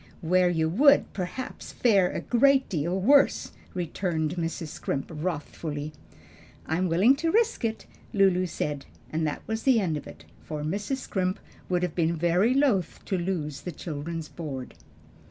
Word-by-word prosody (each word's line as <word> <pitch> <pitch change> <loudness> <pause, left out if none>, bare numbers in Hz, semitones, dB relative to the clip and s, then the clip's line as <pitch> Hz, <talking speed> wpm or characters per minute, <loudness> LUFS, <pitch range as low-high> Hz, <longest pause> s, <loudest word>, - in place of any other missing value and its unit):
"Where 180 +2 +3
you 160 -2 +1
would, 280 - +4
perhaps, 190 +7 -5
fare 200 -7 +3
a - - -4
great 270 +2 +4
deal 170 +2 -1
worse," 275 +8 +4 0.2
returned 170 -2 -1
Mrs. 165 -2 -3
Scrimp 135 +1 -4
wrathfully. 150 -2 -4 0.7
"I 160 - -1
am 185 - +1
willing 195 +11 +5
to 330 +3 0
risk 455 - +2
it," 225 -1 -2 0.3
Lulu 190 -2 +3
said; 145 -4 -3 0.2
and 160 0 0
that 150 - -4
was 220 0 -3
the 255 -3 +4
end 170 -7 0
of 145 - -8
it, 80 -1 -12 0.2
for 150 -1 -5
Mrs. 200 - -2
Scrimp 190 -7 -2 0.3
would 180 -1 +1
have 180 -3 -1
been 170 -1 +1
very 175 +9 +2
loath 250 - +2
to 195 - -1
lose 165 -6 -2
the 175 - -5
children's 160 +1 -5
board. 140 -7 -6
175 Hz, 160 wpm, -27 LUFS, 155-205 Hz, 0.7 s, willing